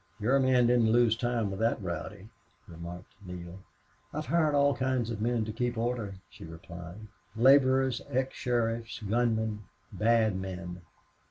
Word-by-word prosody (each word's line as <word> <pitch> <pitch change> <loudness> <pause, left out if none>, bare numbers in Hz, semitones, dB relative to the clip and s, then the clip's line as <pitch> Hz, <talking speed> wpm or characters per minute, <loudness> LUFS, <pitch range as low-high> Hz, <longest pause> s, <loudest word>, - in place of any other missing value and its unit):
"Your 125 +6 +3
men 130 -2 +4
didn't 120 -2 +4
lose 120 -1 +4
time 115 -3 -1
with 95 - -5
that 115 +1 +1
rowdy," 95 +3 -6 0.4
remarked 85 +2 -9
Neale. 90 0 -8 0.5
"I've - - -4
hired 155 +1 +2
all 140 0 +4
kinds 130 -2 -1
of 105 -2 -5
men 115 -1 0
to 110 - -4
keep 120 0 -2
order," 115 -4 -2 0.2
she - - -12
replied. 85 +4 -10 0.3
"Laborers, 130 +1 +4
ex 130 -1 -1
sheriffs, 115 -2 -1
gunmen, 110 -2 0 0.3
bad 110 -2 +2
men. 90 -2 -6
115 Hz, 145 wpm, -29 LUFS, 95-125 Hz, 0.5 s, men